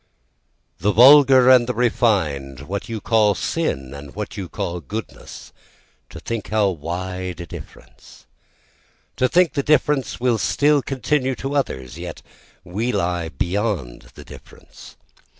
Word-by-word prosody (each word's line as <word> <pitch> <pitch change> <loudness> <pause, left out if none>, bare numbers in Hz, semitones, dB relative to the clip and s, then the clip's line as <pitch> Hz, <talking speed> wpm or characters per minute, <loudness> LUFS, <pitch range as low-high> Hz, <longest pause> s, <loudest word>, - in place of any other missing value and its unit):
The 105 - +1
vulgar 130 +3 +7
and 125 -2 +5
the 125 - -2
refined, 85 - 0
what 95 +10 -6
you 115 -1 -4
call 105 -1 +2
sin 65 -5 -3
and 70 +1 -11
what 105 0 -6
you 95 -4 -6
call 85 0 -4
goodness, 100 +8 -9 0.6
to - - -10
think 115 -3 -5
how 105 -2 +2
wide 90 +2 -5
a 85 - -6
difference, - - -13 0.9
To 130 - +2
think 175 -4 +3
the 140 - 0
difference 145 -1 +1
will 120 -2 +1
still 145 +10 +2
continue 135 0 -1
to 135 +3 -5
others, 65 - -3
yet - - -8 0.4
we 105 +7 -2
lie 85 -5 -1
beyond 85 - -3
the - - -12
difference. - - -15
105 Hz, 135 wpm, -21 LUFS, 85-125 Hz, 0.9 s, vulgar